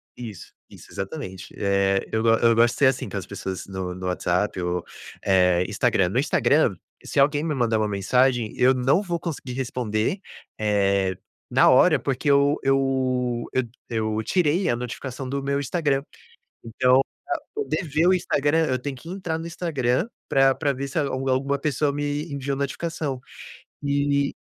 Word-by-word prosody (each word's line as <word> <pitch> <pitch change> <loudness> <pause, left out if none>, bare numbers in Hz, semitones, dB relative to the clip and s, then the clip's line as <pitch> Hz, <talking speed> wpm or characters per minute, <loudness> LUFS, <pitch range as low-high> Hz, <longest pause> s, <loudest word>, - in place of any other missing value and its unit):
Isso, 110 -6 -9 0.2
isso, - - -14
exatamente. 95 -1 -6
Eh, 100 -1 +1
eu 110 - 0
go 115 - +4
eu 115 -1 +4
gosto 120 +1 +4
de - - -9
ser 140 - +5
assim 130 -1 0
com - - -4
as 95 - -4
pessoas 95 -2 -5
no 95 -2 -4
no 90 0 -7
WhatsApp 90 +2 0
ou, 90 0 -2 0.4
eh, 90 -2 +3
Instagram. - - +1
No - - 0
Instagram, - - +2 0.3
se - - -2
alguém 145 +2 +3
me 160 -2 -1
mandar 120 -5 +1
uma 110 - +1
mensagem, 120 +4 +1
eu 130 +1 +4
não 130 +8 +2
vou 175 -4 -3
conseguir 150 -7 -5
responder, 125 - -1 0.4
eh, 100 -3 +1 0.3
na - - +5
hora 155 +3 +5
porque 140 +2 -1
eu 140 +1 +4
eu 130 -3 +1
eu 130 - +2 0.3
eu 110 -1 -1
tirei 175 - +1
a - - +2
notificação 125 +2 -6
do 140 +1 -2
meu 140 0 0
Instagram. 140 -1 0 0.6
Então, 125 +3 +3 0.2
pra 350 -2 -2
poder 425 - -2
ver 155 +3 +1
o 185 - +5
Instagram, 160 -2 +1
eu 130 -3 0
tenho 135 +2 -5
que 145 +6 -12
entrar 180 -4 -3
no 165 - -6
Instagram 160 - -1 0.2
pra 135 0 +4
pra 145 -1 0
ver 140 +1 -4
se 135 - -3
algu 135 -2 -1
alguma 135 +2 +1
pessoa 145 0 0
me 145 +2 -3
enviou 140 0 -2
notificação 140 0 -3 0.6
e 140 0 +1
130 Hz, 170 wpm, -24 LUFS, 110-145 Hz, 0.6 s, ser